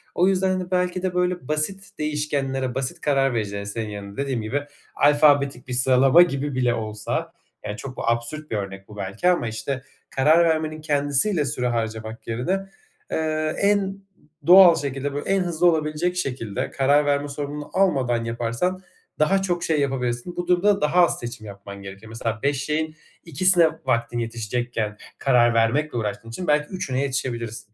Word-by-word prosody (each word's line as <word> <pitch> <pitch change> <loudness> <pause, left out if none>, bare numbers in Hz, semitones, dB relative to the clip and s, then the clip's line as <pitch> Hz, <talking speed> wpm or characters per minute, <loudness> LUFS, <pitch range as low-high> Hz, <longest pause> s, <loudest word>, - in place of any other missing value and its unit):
O 180 - +4
yüzden 190 -1 +2
de 180 - -8
belki 180 0 0
de, 185 -1 -1
böyle 180 -5 0
basit 190 +6 -2
değişkenlere, 140 -4 -1
basit 130 -1 -3
karar 135 -3 +2
vericilere 100 -3 -3
senin 110 +1 -4
yerine 100 -1 -8
dediğim 135 -4 -1
gibi, 130 +7 -2 0.3
alfabetik 145 -3 +3
bir 125 - -4
sıralama 130 +5 +5
gibi 145 -5 +1
bile 125 -2 +2
olsa, 110 -2 -3 0.3
yani, 105 - -4
çok 130 -1 -8
absürt 120 +7 -3
bir 110 - 0
örnek 95 -1 -6
bu 105 - -12
belki 100 - 0
ama 175 -9 +1
işte 130 +4 -4 0.3
karar 155 +6 +4
vermenin 155 -1 0
kendisiyle 145 +3 +1
süre 125 -2 -1
harcamak 110 -1 -4
yerine, 120 +8 -2 0.6
ııı, 155 -1 0
en 205 +1 +4
ı 195 0 -3 0.5
doğal 180 -1 +9
şekilde, 140 -1 -3
böyle, 145 +6 -4
en 195 - +3
hızlı 175 -1 +1
olabilecek 160 +2 +1
şekilde 125 - -3
karar 145 +2 +3
verme 145 0 +1
sorumluluğunu 145 +1 -5
almadan 130 -12 +2
yaparsan 120 +11 -2 0.4
daha 190 +6 +3
çok 175 -3 -1
şey 155 -2 +1
yapabilirsin. 130 +2 -2
Bu 175 0 -4
durumda 190 +2 +3
daha 175 +4 +5
az - - -2
seçim 120 -2 -7
yapman 100 0 -10
gerekiyor. 100 +3 -10
Mesela 115 0 -3
5 140 -1 0
şeyin 155 +1 -2 0.3
2'sine 170 +1 +4 0.2
vaktin 120 -2 0
yetişecekken, 115 -1 -3 0.2
karar 120 -3 +4
vermekle 120 +5 +1
uğraştığın 105 0 -4
için 180 +10 -6
belki 150 0 +2
3'üne 135 -8 -2
yetişebilirsin. 120 -5 -3
140 Hz, 160 wpm, -23 LUFS, 115-160 Hz, 0.6 s, doğal